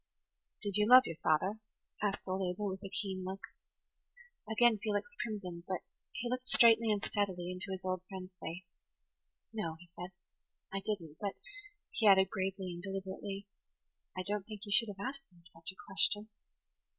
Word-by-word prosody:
"Did 205 -1 0
you 210 0 +3
love 255 +1 +11
your 165 - -5
father?" 190 +9 +1 0.4
asked 205 -2 -1
old 190 +1 -1
Abel, 200 +3 -2
with 190 0 -6
a 195 - -5
keen 190 -2 -3
look. 190 +1 -5 1.1
Again 220 0 +4
Felix 205 +1 -1
crimsoned; 185 -6 -5
but 185 -2 -2 0.3
he 235 +2 -4
looked 255 +1 -2
straightly 230 -1 +7
and 205 -1 0
steadily 185 -4 -1
into 180 +2 -4
his 190 -1 -4
old 185 -1 -1
friend's 190 -1 -7
face. 170 +3 -6 0.9
"No," 170 -7 -2
he 175 - -13
said, 175 +1 -7 0.6
"I 195 - 0
didn't; 175 -8 -3
but," 200 -2 -2 0.6
he 220 - +2
added, 190 -1 +7
gravely 190 -2 -2
and 175 - -7
deliberately, 195 +1 -5 0.7
"I 185 - -1
don't 205 +1 -2
think 215 -2 -8
you 205 - -7
should 230 +2 +6
have 200 +3 -4
asked 275 -3 -8
me 175 -1 -22
such 165 +1 -1
a 190 - -21
question." 205 +2 +3
195 Hz, 170 wpm, -34 LUFS, 185-210 Hz, 1.1 s, love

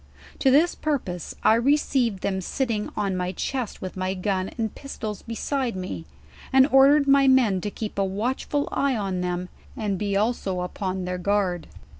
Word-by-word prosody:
To 270 - +4
this 305 +6 +4
pur 305 -2 0
pose, 180 - -7
I - - +6
received 240 -4 +2
them 190 -1 -1
sitting 225 +1 -2
on 200 -3 0
my 180 0 -1
chest 250 +2 -3
with 185 - -5
my 185 0 -2
gun 185 0 -1
and 220 -3 -2
pistols 220 -7 -6
beside 240 +1 -2
me, 185 -3 -5 0.5
and 265 0 +7
ordered 280 +2 +6
rny 275 -1 +5
men 230 -8 +4
to 205 - -2
keep 210 -1 -5
a - - +3
watchful 245 +9 -1
eye 275 -1 +1
on 195 -4 -2
them 180 0 -2 0.3
and 205 -4 -1
be 200 -1 0
also 200 -4 0
upon 185 0 -3
thuir 180 0 -3
guard 190 -3 0
210 Hz, 175 wpm, -25 LUFS, 185-265 Hz, 0.5 s, and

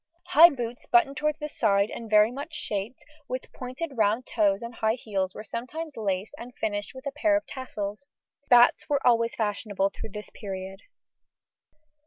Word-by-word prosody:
High 335 +3 +9
boots 240 -5 -5
buttoned 265 +3 +3
towards 300 0 0
the 300 -2 -4
side 200 -7 +1
and 230 -1 -7
very 210 +1 +5
much 290 +5 -7
shaped, 220 -4 -4 0.2
with 255 +1 -5
pointed 265 +4 -6
round 220 +3 +2
toes 205 -2 +1
and 235 +1 -6
high 220 0 +1
heels 195 -6 -3
were - - -7
sometimes 280 +8 -6
laced 200 -1 -2
and 245 +1 -10
finished 205 +3 -3
with 260 +2 -10
a 280 - -2
pair 305 +2 +2
of 310 - -5
tassels. 215 -2 -6 0.4
Spats 245 +5 +5
were 285 -1 0
always 230 -1 +3
fashionable 205 -2 -1
through 220 - -8
this 210 +1 -8
period. 195 -1 -6
235 Hz, 170 wpm, -27 LUFS, 205-275 Hz, 0.4 s, High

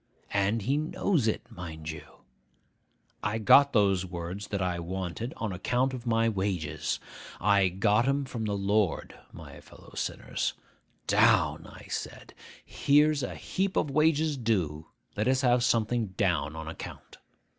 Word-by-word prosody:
And 100 +2 +1
he 135 +7 +1
knows 155 - 0
it, 110 - 0
mind 80 -6 -7
you! 80 - -12 1.0
I 105 +3 -1
got 140 +6 +6
those 100 -5 +3
words 90 +2 -6
that 100 - -2
I 90 -2 -1
wanted 95 +6 -4
on 110 -3 -3
account 125 +8 0
of 125 -1 -7
my 115 0 +3
wages. 90 -8 -2 0.4
I 100 0 +4
got 105 +6 +2
'em 140 0 +1
from 120 -4 -4
the 105 -1 -1
Lord, 100 -2 0 0.2
my - - -11
fellow - - -16
sinners. - - -3 0.5
Down! - - +3
I - - -13
said, - - -6 0.3
"Here's 150 +1 +3
a 125 - -4
heap 195 +1 -2
of 145 - +1
wages 155 0 +2
due; 90 - -1 0.3
let 105 +3 0
us 130 0 +3
have 125 -2 +3
something 115 -1 +1
down, 85 -6 0
on 80 0 -6
account." 80 - -9
105 Hz, 145 wpm, -28 LUFS, 90-130 Hz, 1.0 s, got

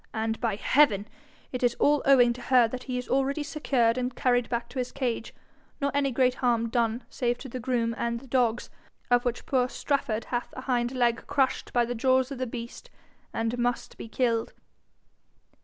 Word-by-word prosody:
And, 220 0 -2
by 225 -4 0
heaven! 215 -3 +3 0.4
it 250 - -4
is 240 -1 +2
all 295 0 +3
owing 245 -3 +6
to 250 - -10
her 245 -1 +4
that 255 +2 -7
he 255 -2 -3
is 250 - -4
already 275 +3 0
secured 260 -6 +1
and 250 0 -3
carried 245 -2 +1
back 235 -1 -2
to 260 - -5
his 250 - -2
cage, 245 -4 -2 0.5
nor 280 -1 0
any 280 -1 +2
great 255 0 +2
harm 235 -3 +1
done 230 0 0
save 240 -1 -1
to 265 - -9
the 255 0 -6
groom 235 -2 0
and 235 0 -2
the 265 - -14
dogs, 245 -2 0 0.4
of 245 +1 +4
which 245 -1 -2
poor 255 -2 +1
Strafford 240 -6 -1
hath 240 -1 -3
a - - -4
hind 245 -2 0
leg 240 -2 +1
crushed 270 -2 0
by 240 -1 +2
the 245 - -3
jaws 260 +2 +2
of 270 - -5
the 255 - -1
beast, 235 - -8 0.4
and 225 +2 -2
must 245 0 -1
be - - -8
killed.' 230 -1 0
245 Hz, 195 wpm, -27 LUFS, 235-260 Hz, 0.5 s, owing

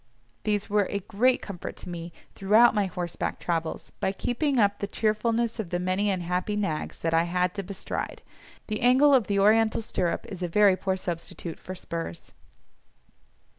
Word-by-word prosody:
These 210 -2 0
were 205 -1 +2
a 200 - -2
great 245 +7 +2
comfort 190 -4 -6
to - - -10
me 170 0 -6 0.2
throughout 215 +5 +5
my 205 -3 +1
horseback 175 -1 -4
travels, 165 -2 -3
by 190 - +1
keeping 260 +7 -1
up 205 -2 +3
the 200 - -2
cheerfulness 225 +2 0
of 205 -6 -3
the 175 - -1
many 185 +3 0
unhappy 180 +2 -1
nags 195 -7 -2
that 165 0 -1
I 165 +1 +4
had 180 +1 0
to 200 - -3
bestride; 190 +1 -5 0.4
the 215 -1 -3
angle 260 +4 +6
of 250 -5 +4
the 200 - 0
Oriental 220 +2 +4
stirrup 180 -5 -1
is 185 -3 -7
a 175 - 0
very 200 +2 +5
poor 190 0 -1
substitute 170 -2 -5
for 185 - -7
spurs. 170 -2 -6
200 Hz, 170 wpm, -27 LUFS, 180-215 Hz, 0.4 s, angle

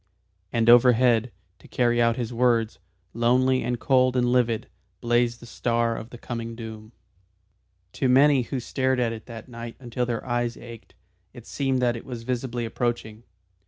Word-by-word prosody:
And 115 -1 0
overhead, 120 -1 +5 0.3
to - - -17
carry 120 -1 +1
out 115 -1 +3
his 120 -1 -4
words, 115 -2 +1 0.3
lonely 130 +3 +2
and 120 -1 -2
cold 130 -1 +2
and 120 -1 +2
livid, 120 -3 +1 0.3
blazed 120 0 +1
the - - -11
star 115 -1 -1
of 110 - -8
the 120 - -10
coming 115 -1 -6
doom. 110 -1 -9 1.0
To 130 - 0
many 135 +1 +5
who 125 +2 -4
stared 130 +1 -1
at 115 -2 0
it 110 0 -10
that 115 -2 -9
night 115 -1 -8
until 125 -1 -3
their 115 -2 -3
eyes 120 -1 -1
ached, 115 -2 -12 0.4
it - - -12
seemed 135 -2 -1
that 120 -1 +2
it 115 - -7
was 120 -3 -6
visibly 120 -1 -3
approaching. 115 -2 -3
120 Hz, 165 wpm, -25 LUFS, 115-125 Hz, 1.0 s, overhead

